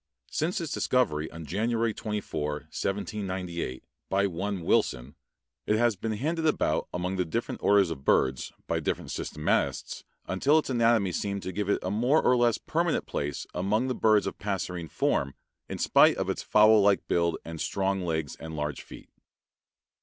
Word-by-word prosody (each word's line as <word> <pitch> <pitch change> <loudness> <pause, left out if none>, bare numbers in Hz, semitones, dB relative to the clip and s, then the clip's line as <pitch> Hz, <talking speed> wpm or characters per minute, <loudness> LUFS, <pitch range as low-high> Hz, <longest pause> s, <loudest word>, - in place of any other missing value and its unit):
Since 165 +4 -1
its 165 -4 -4
discovery 80 -12 +1
on 80 0 -9
January 115 +6 0
24, 105 -9 -3 0.2
1798, 95 - -3 0.3
by 100 +1 +2
one 95 +1 -3
Wilson, 60 -4 +1 0.5
it 105 - +3
has 120 -1 +3
been 110 +4 -3
handed 160 +8 -1
about 110 - +1
among 90 +2 -2
the 90 - +2
different 115 +8 -3
orders 100 -4 +4
of 70 -4 -6
birds 65 -2 +2
by - - -1
different - - -3
systematists 75 - -1 0.2
until 135 +11 +2
its 155 - 0
anatomy 115 -5 +3
seemed 100 +2 -3
to 95 - -4
give 100 +1 -3
it - - +3
a 95 - -2
more 125 +9 +3
or 125 - +3
less 120 -2 +3
permanent - - -1
place 70 -1 -3
among 105 +8 0
the - - 0
birds 110 -3 +3
of - - -5
passerine 90 -4 -3
form, 70 -1 0 0.3
in - - -4
spite - - +5
of - - -1
its - - -4
fowl 110 0 +5
like 100 0 +3
build 85 -1 +1
and 80 -1 -6
strong 95 0 0
legs 80 -4 -2
and 80 0 -7
large 75 -2 -3
feet. - - -12
100 Hz, 170 wpm, -28 LUFS, 85-110 Hz, 0.5 s, spite